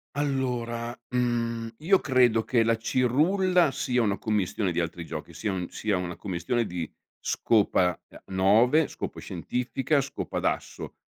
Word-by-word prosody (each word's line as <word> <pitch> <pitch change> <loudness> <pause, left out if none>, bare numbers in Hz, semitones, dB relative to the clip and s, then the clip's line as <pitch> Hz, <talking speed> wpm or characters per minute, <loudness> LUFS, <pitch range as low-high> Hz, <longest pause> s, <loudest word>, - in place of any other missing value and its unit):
Allora, 125 -4 -2
mhmm, 115 -2 -1
io 185 +5 +3
credo 125 -4 +3
che 115 -1 +2
la 115 0 +2
cirulla 160 - +2
sia 125 -1 0
una 100 -3 +1
commistione 105 -3 -1
di 85 - -1
altri 85 0 -3
giochi, 80 +1 -7
sia 105 +4 -2
un 90 -2 -3
sia 105 -3 -1
una 90 -1 -4
commistione 100 +5 -2
di 85 -4 -5 0.3
scopa, 95 -5 +2
uhm, - - -13 0.2
9, 115 +11 +4
scopa - - -6
scientifica, 125 - -1
scopa 140 +1 -4
d'asso. - - -3
115 Hz, 140 wpm, -27 LUFS, 95-130 Hz, 0.3 s, 9